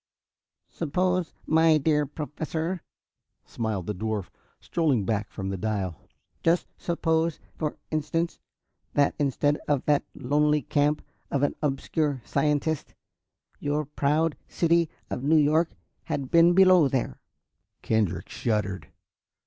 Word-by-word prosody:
"Suppose, 180 +2 0
my 160 0 +5
dear 150 0 +2
Professor," 160 +4 -4 0.6
smiled 110 -6 -3
the 105 - -2
dwarf, 105 0 -3 0.3
strolling 145 - +1
back 105 +1 -1
from 95 -2 -5
the 95 - -3
dial, 100 -5 -2 0.5
"just 170 +1 +2
suppose, 165 -1 0 0.2
for 150 -2 -3
instance, 160 +2 -1 0.6
that 145 -1 +4
instead 145 +1 +1
of 145 -3 +1
the 145 -1 +3
lonely 150 +2 +2
camp 145 +3 +1 0.3
of 140 0 0
an 145 - +2
obscure 145 0 0
scientist, 150 0 0 0.6
your 150 +1 -1
proud 150 +2 +1
city 170 -1 +2 0.2
of 125 - -2
New 155 +3 +4
York 155 +3 +3 0.4
had 135 -2 -3
been 170 +1 +6
below 185 -5 +7
there!" 130 - -2 0.6
Kendrick 105 -5 0
shuddered. 105 -4 -2
150 Hz, 115 wpm, -27 LUFS, 125-160 Hz, 0.6 s, below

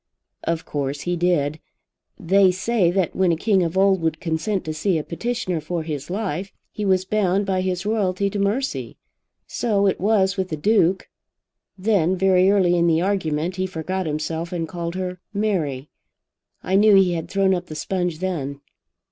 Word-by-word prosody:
"Of 165 -1 -1
course 145 0 -3
he 175 0 -1
did. 160 -4 +1 0.6
They 195 +1 +4
say 185 0 +1
that 180 -1 0
when 185 -2 +3
a - - +2
king 195 +3 +2
of 170 +1 -1
old 195 -1 +4
would 160 -1 -1
consent 175 +4 -2
to 155 - -3
see 170 +3 0
a 155 - -2
petitioner 185 -2 -3
for 165 +2 -3
his 150 -2 -5
life, 195 -1 -3 0.2
he 210 - -5
was 185 -1 +2
bound 200 -1 +1
by 190 -1 0
his 185 0 -2
royalty 200 -3 0
to 205 - -3
mercy. 215 +8 -1 0.5
So 205 -4 0
it 195 - +1
was 200 -2 +2
with 190 -1 -1
the 155 - -3
Duke. 190 +1 +2 0.7
Then, 190 -3 +2
very 190 0 +4
early 185 -3 +3
in 170 0 +3
the 165 0 +3
argument, 180 -3 -1
he 185 0 -1
forgot 185 +1 -3
himself, 160 +2 -3
and 170 -2 -2
called 170 0 -5
her 180 -1 -4 0.2
Mary. 160 -11 -1 0.8
I 190 +1 +2
knew 210 0 +6
he 190 -2 +4
had 165 0 -4
thrown 195 0 +2
up 180 -1 -3
the 155 - -8
sponge 180 +1 -2
then." 150 -6 -3
185 Hz, 180 wpm, -22 LUFS, 165-195 Hz, 0.8 s, knew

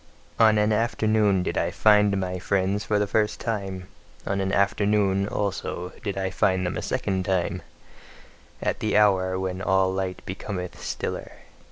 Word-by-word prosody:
On 110 -1 +6
an 105 +1 +3
afternoon 110 -3 +2
did - - -1
I - - 0
find 105 -2 +4
my 90 -1 -3
friends 100 +2 0
for 105 -1 0
the 105 - +2
first 105 +1 0
time; 95 -5 -4 0.4
on 100 0 -1
an 95 0 -1
afternoon, 100 0 +2
also, 95 -3 -3
did 100 -2 -3
I 95 -1 -1
find 95 0 +1
them 90 - -2
a - - -3
second 95 -1 -1
time: 90 -1 -1 1.0
at - - -1
the 110 -1 +1
hour 95 -3 +3
when 95 0 -3
all 95 -1 +2
light 95 -1 -3
becometh 95 -1 -6
stiller. - - -4
95 Hz, 160 wpm, -25 LUFS, 95-105 Hz, 1.0 s, On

